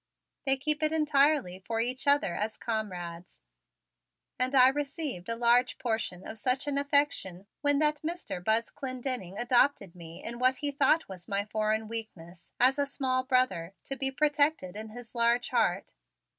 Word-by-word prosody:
They 270 0 +4
keep 300 +3 0
it 310 0 +2
entirely 290 - +2
for 225 +4 -4
each 250 +4 0
other 285 -11 +3
as 215 +4 -3
comrades, 180 -6 -5 1.0
and 255 +2 +1
I 255 0 +8
received 280 - -4
a 230 - -1
large 240 +2 +3
portion 220 -6 -3
of 220 - -8
such 255 +4 +1
an 285 -1 0
affection 280 - 0 0.2
when 290 -1 +3
that 300 0 +1
Mr. 325 - -5
Buzz 220 +3 +1
Clendenning 255 -7 -4
adopted 240 -6 +2
me 165 -1 -11
in 235 +1 -4
what 255 +1 +3
he 290 -1 -1
thought 285 +3 +2
was 185 -2 -10
my 200 0 -1
foreign 215 +1 -1
weakness, 185 -7 -7
as 260 +3 +4
a 285 - +1
small 255 -2 -1
brother 225 - 0
to 275 - -3
be 270 0 +1
protected 290 - +1
in 220 +1 -6
his 240 +1 -11
large 235 0 +2
heart. - - 0
250 Hz, 165 wpm, -29 LUFS, 210-280 Hz, 1.0 s, I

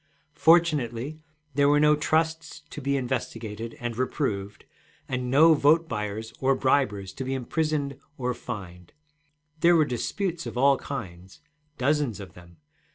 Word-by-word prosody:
Fortunately 155 -5 +2 0.3
there 140 +1 +3
were 145 0 +4
no 150 0 +5
trusts 160 +2 -1
to 150 - -7
be 140 +1 0
investigated 115 -3 -4
and 120 -1 -4
reproved, 105 -5 -3 0.4
and 125 -1 -3
no 155 +5 +6
vote 155 +3 +4
buyers 105 -2 -4
or 135 0 +2
bribers 105 -9 +1
to 135 - -4
be 130 +1 -2
imprisoned 140 +1 -2 0.2
or 125 -1 -1
fined. 90 -7 -8 0.7
There 170 +1 +5
were 155 -2 +4
disputes 170 - -3
of - - -6
all 135 +1 +5
kinds, 95 -8 -8 0.4
dozens 135 -5 0
of 95 -4 -10
them. 85 -1 -16
130 Hz, 140 wpm, -26 LUFS, 110-150 Hz, 0.7 s, no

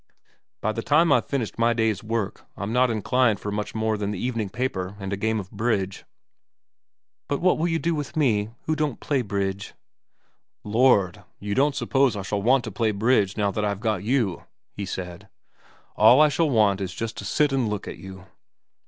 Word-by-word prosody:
By 110 - 0
the 115 - -4
time 155 +5 +3
I' - - +6
ve - - -10
finished 125 -5 -3
my 115 0 +3
day's 110 -4 0
work, 110 -2 -3
I'm 100 +2 -4
not 125 +1 +3
inclined 115 0 +1
for 105 - -4
much 105 +1 -4
more 110 -1 0
than 100 -1 -2
the 105 - -3
evening 115 -2 -2
paper 100 -5 -3
and 95 0 -4
a - - +1
game 110 +2 -1
of 95 -1 -8
bridge.' 100 -3 -2 0.6
' - - -66
But 140 - 0
what 185 -2 +2
will 165 - +1
you 165 -1 0
do 165 +3 0
with 150 +1 -4
me, 110 -8 +2
who 155 - 0
don't 150 -4 -2
play 140 -3 0
bridge? 100 -2 -3 0.3
' - - -45
' - - -57
Lord, 110 -8 +3 0.2
you 100 0 -3
don't 140 +4 +2
suppose 135 -4 +2
I 100 - -4
shall 100 +1 -2
want 125 +4 +3
to 110 - -6
play 110 +3 0
bridge 105 -1 +1
now 100 -2 +1
that 105 - -2
I 105 - +1
r 100 - -1
ve 100 - -14
got 110 -5 -1
you? 115 -6 0
' - - -57
he 100 -1 -5
said. 90 -2 -7 0.3
* - - -31
All 125 - +7
I 155 0 +6
shall 155 +2 +1
want 105 -6 +3
is 95 -2 -4
just 115 0 -4
to - - -6
sit 150 -2 +1
and 130 -5 +1
look 105 -2 -4
at - - -7
you.' 95 -1 -10
110 Hz, 225 wpm, -24 LUFS, 100-130 Hz, 0.6 s, All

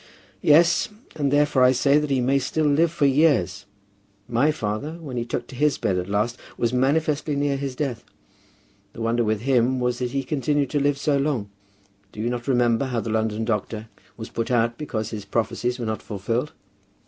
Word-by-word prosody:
"Yes; 170 +3 +4 0.3
and 140 -3 0
therefore 145 -2 +3
I 125 0 +6
say 140 +3 +3
that 150 -1 -2
he 135 -2 +1
may 135 +3 +2
still 155 +4 -1
live 155 +3 +3
for 160 -3 +1
years. 135 - +2 0.6
My 120 +6 +2
father, 130 +1 -2
when 160 -6 -8
he 120 -1 -2
took 120 - -3
to - - -9
his 150 +2 +2
bed 95 - 0
at 90 +2 -5
last, 105 +4 0 0.2
was 120 0 0
manifestly 145 +3 +1
near 140 0 +1
his 135 -1 -4
death. 125 -5 -3 0.9
The - - -8
wonder 115 +1 +1
with 110 -1 0
him 130 0 +2
was 125 -1 -1
that 125 -1 -1
he 135 +1 -2
continued 145 -1 0
to 145 - +1
live 140 0 +1
so 140 0 +1
long. 130 -8 -1 0.6
Do - - -11
you 115 +3 -1
not 120 -1 -4
remember 120 -1 +2
how 125 -3 -2
the 110 - -3
London 110 0 0
doctor 110 0 -3 0.3
was 110 - -7
put 115 0 -3
out 120 -1 +2
because 115 -8 -3
his 105 -3 -5
prophecies 120 +4 -1
were 120 - -4
not 110 0 -3
fulfilled?" 115 +7 -3
125 Hz, 195 wpm, -24 LUFS, 115-145 Hz, 0.9 s, I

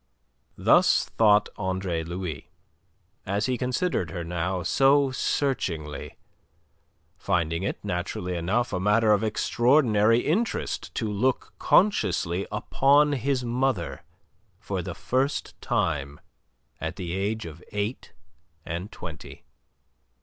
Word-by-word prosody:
Thus - - +4
thought 105 -2 +4
Andre 95 -4 -2
Louis 85 -3 -5 0.7
as 100 +2 -1
he 130 - 0
considered 125 - -1
her 85 +2 -5
now 90 +2 -2
so 135 +3 +4
searchingly, 90 - -2 1.0
finding 85 -3 0
it, 100 - -2
naturally 90 -1 -3
enough, 95 +9 0
a 90 - 0
matter 105 +3 +3
of 105 0 +3
extraordinary 115 0 +3
interest 200 +8 -1
to 110 - -1
look 110 +5 -1
consciously 100 - +2
upon 140 +7 +3
his 135 -1 0
mother 120 -7 -1 0.6
for - - -4
the - - -6
first 135 +3 -2
time 75 -9 -1 0.6
at - - -4
the 85 -2 -5
age 105 +2 -2
of 85 +1 -10
eight 105 +4 -3 0.5
and 90 +6 -5
twenty. 80 -4 -9
105 Hz, 110 wpm, -26 LUFS, 90-125 Hz, 1.0 s, Thus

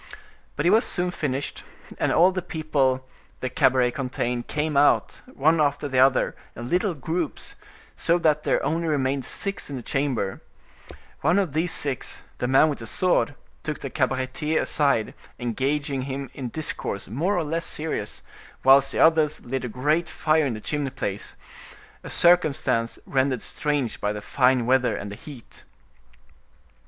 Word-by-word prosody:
But 145 - -2
it 175 - +5
was 220 +3 +5
soon 180 0 0
finished, 140 -5 -3 0.4
and - - +1
all 180 +3 +5
the 185 0 -3
people 140 -6 0 0.3
the 130 - -3
cabaret 125 -1 +3
contained 125 -2 -3
came 150 0 -2
out, 145 +1 +3
one 160 - +2
after 145 0 0
the 130 -2 0
other, 130 0 +3 0.2
in 120 +1 -6
little 180 0 +1
groups, 160 +3 -4 0.4
so 170 - +2
that 155 -3 +2
there - - 0
only 165 +1 0
remained 135 -3 0
six 200 -5 -3
in 140 - -5
the 125 - -6
chamber; 130 -9 -1 0.8
one 165 +6 +2
of 185 -8 0
these 165 +3 0
six, 140 -3 -4 0.2
the 125 - -1
man 135 +4 +5
with 150 - -3
the 115 - -7
sword, 180 - +1 0.3
took 155 -1 -4
the 135 - -5
cabaretier 130 +3 0
aside, 140 -8 +1 0.2
engaging 135 +3 -1
him 135 +1 -5
in 130 -3 -5
discourse 115 -8 -4
more 165 - 0
or 175 - +1
less 165 +2 -2
serious, 150 -9 -3 0.4
whilst 135 +1 +6
the - - -2
others 160 -2 +4
lit 130 +2 -4
a 125 - -3
great 150 +8 0
fire 155 -1 +2
in 120 - -2
the 110 - -8
chimney 145 +1 -2
place—a 100 -5 -9
circumstance 155 -9 +3
rendered 130 -3 0
strange 145 -5 -2
by 105 - 0
the 105 - -4
fine 125 -2 +2
weather 130 0 +2
and 100 - -6
the - - -6
heat. 125 +1 -12
140 Hz, 160 wpm, -24 LUFS, 130-155 Hz, 0.8 s, whilst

